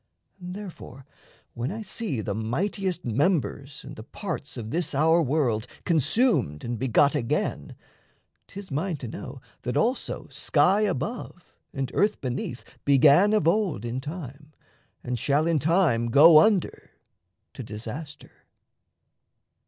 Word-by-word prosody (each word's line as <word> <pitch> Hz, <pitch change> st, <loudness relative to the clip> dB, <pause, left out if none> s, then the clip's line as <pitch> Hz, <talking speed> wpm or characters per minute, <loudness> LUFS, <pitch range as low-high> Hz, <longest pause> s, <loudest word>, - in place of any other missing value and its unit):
And 180 Hz, 0 st, -7 dB
therefore 170 Hz, -, -10 dB, 0.5 s
when 120 Hz, +3 st, -3 dB
I 220 Hz, +2 st, -5 dB
see 200 Hz, -, -3 dB
The 100 Hz, -, -3 dB
mightiest 175 Hz, -, -2 dB
members 140 Hz, -, -1 dB
and 140 Hz, +2 st, -9 dB
the -, -, -9 dB
parts 155 Hz, -, -6 dB
of 110 Hz, -2 st, -6 dB
this 165 Hz, -3 st, -1 dB
Our 160 Hz, +4 st, +4 dB
world 125 Hz, -6 st, 0 dB, 0.2 s
consumed 170 Hz, -, +1 dB
and 120 Hz, -1 st, -4 dB
begot 130 Hz, +3 st, +3 dB
again, 150 Hz, -, -2 dB, 0.7 s
'Tis 195 Hz, -3 st, -10 dB
mine 160 Hz, +4 st, -2 dB
to 130 Hz, -, -7 dB
know 130 Hz, +3 st, -8 dB, 0.2 s
that 125 Hz, +2 st, -2 dB
also 240 Hz, -, -1 dB
sky 200 Hz, +3 st, +2 dB
above 185 Hz, -, -4 dB, 0.2 s
And 135 Hz, -2 st, -4 dB
earth 210 Hz, +1 st, +1 dB
beneath 125 Hz, -1 st, -4 dB, 0.2 s
began 145 Hz, +8 st, +5 dB
of 210 Hz, -7 st, +2 dB
old 175 Hz, -, +1 dB
in 120 Hz, +2 st, -3 dB
time 150 Hz, -1 st, -8 dB, 0.5 s
And 125 Hz, -1 st, -3 dB
shall 145 Hz, +5 st, +1 dB
in 165 Hz, -2 st, +2 dB
time 155 Hz, -7 st, +2 dB
go 155 Hz, +6 st, +8 dB
under 200 Hz, +1 st, +1 dB, 0.6 s
to -, -, -8 dB
disaster. 120 Hz, +8 st, -8 dB
150 Hz, 130 wpm, -26 LUFS, 125-180 Hz, 0.7 s, go